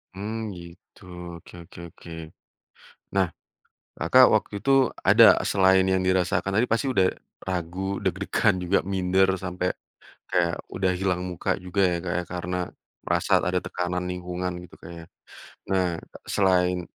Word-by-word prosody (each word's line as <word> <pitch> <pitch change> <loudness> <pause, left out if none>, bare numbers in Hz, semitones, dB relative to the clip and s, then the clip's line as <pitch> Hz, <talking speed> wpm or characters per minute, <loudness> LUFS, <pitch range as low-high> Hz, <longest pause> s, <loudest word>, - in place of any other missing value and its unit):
Mmm, 110 +2 -4
gitu, 85 +3 -15 0.4
oke - - -17
oke - - -14
oke. 85 +1 -14 1.0
Nah, 95 -2 +3 0.7
Kakak - - +6
waktu - - -1
itu 135 - 0 0.4
ada - - +7 0.3
selain 95 -1 +4
yang 95 0 +2
dirasakan 95 +1 +1
tapi 125 - +3
pasti 115 +5 0
udah 95 -7 +3 0.4
ragu 90 -1 -3 0.2
deg-degan 95 +2 +1
juga 90 +2 +2
minder, 95 0 +2
sampai 90 0 -1 0.6
kayak 85 -1 +1 0.2
udah 95 -1 0
hilang 90 -1 -1
muka 90 +2 -3
juga 90 +2 -2
ya, 90 -1 +2
Kak, 85 - -2
ya, - - -1
karena 90 0 -3 0.5
merasa - - -1 0.2
ada 90 0 0
tekanan 90 0 -3
lingkungan 90 0 -4
gitu, 90 - -15
Kak, 85 - -11
ya. 85 - -10 0.7
Nah, 95 -2 +2 0.4
selain 90 -2 +2
90 Hz, 140 wpm, -25 LUFS, 90-95 Hz, 1.0 s, ada